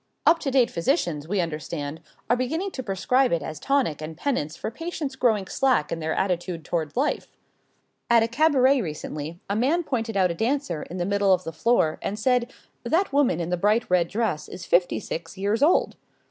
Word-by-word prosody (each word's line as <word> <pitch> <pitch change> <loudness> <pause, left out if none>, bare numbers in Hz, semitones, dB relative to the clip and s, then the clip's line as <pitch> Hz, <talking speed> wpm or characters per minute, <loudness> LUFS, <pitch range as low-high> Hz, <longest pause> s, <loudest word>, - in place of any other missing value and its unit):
Up 330 +1 +5
to 285 - -2
date 260 -3 +3
physicians, 170 - 0
we 195 +1 +1
understand, 155 -1 -4 0.3
are 240 - +3
beginning 320 +11 -2
to 260 - -5
prescribe 250 +5 +1
it 170 - 0
as 155 -1 -6
tonic 260 - 0
and 155 0 -7
penance 165 - -2
for - - -4
patients 325 -1 -5
growing 220 -7 +2
slack 255 - +1
in 165 - -2
their 160 0 -2
attitude 175 -3 -2
toward 165 +2 -3
life. 285 +4 0 0.8
At 235 -1 +6
a - - +1
cabaret 270 0 +3
recently 155 -1 -5
a 200 - -1
man 285 +10 +2
pointed 225 -7 -2
out 185 -2 +3
a - - -2
dancer 225 - -1
in 180 - -7
the 175 - -1
middle 200 0 +3
of 180 - -9
the 165 - -6
floor 160 -3 +2
and 205 - -3
said: 250 +2 +1 0.3
"That 350 -1 +1
woman 280 - +3
in 170 0 -3
the 180 - +1
bright 210 +5 +2
red 175 -2 +3
dress 205 -6 -2
is 180 - -8
fifty 175 0 +2
six 165 +3 -6
years 205 +5 0
old." 315 +5 +3
205 Hz, 200 wpm, -25 LUFS, 170-260 Hz, 0.8 s, At